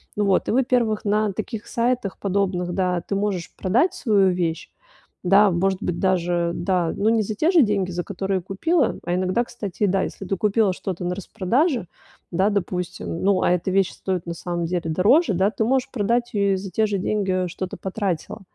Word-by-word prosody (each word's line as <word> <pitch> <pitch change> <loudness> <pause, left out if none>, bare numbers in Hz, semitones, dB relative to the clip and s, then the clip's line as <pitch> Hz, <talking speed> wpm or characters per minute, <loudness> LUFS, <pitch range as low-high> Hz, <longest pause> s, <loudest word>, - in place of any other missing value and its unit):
Ну 210 - 0
вот, 195 -2 +2
и - - +1
во-первых, 240 -3 +1
на 210 0 +1
таких 215 +2 -5
сайтах 240 -4 -1
подобных, 185 -3 -1
да, 180 -1 0
ты 200 - -4
можешь 195 -4 -2
продать 240 - +2
свою 200 -5 +3
вещь, 170 -2 -2 0.5
да, 195 +2 +5
может 190 +3 0
быть 175 -1 -2
даже, 175 -2 +1
да, 175 -1 0
ну, 205 - 0
не 225 -1 +3
за 215 - -3
те 310 +10 +2
же 345 -4 +6
деньги, 200 -4 0
за 175 0 -3
которые 195 0 -2
купила, 255 - 0
а 175 +1 0
иногда, 185 +5 +1
кстати, 210 -5 -5
и 205 - +4
да, 190 +1 +1
если 195 - -6
ты 195 - -1
купила 210 -1 +2
что-то 180 -1 -5
на 180 +1 -1
распродаже, 230 - 0 0.4
да, 190 +4 +2
допустим, 180 -4 -3
ну, 195 -1 +3
а - - +2
эта 180 +1 0
вещь 195 -1 +2
стоит 185 -3 -3
на 170 - -4
самом 170 0 -3
деле 175 +1 -1
дороже, 210 - +4
да, 190 +3 +2
ты 220 - -1
можешь 260 +2 +1
продать 240 +1 0
её 200 -2 +2
и - - +2
за 190 0 -7
те 220 +5 +2
же 205 - -1
деньги, 190 -2 0
что 185 +2 -5
ты - - -9
потратила. 190 0 -3
195 Hz, 205 wpm, -23 LUFS, 180-215 Hz, 0.5 s, же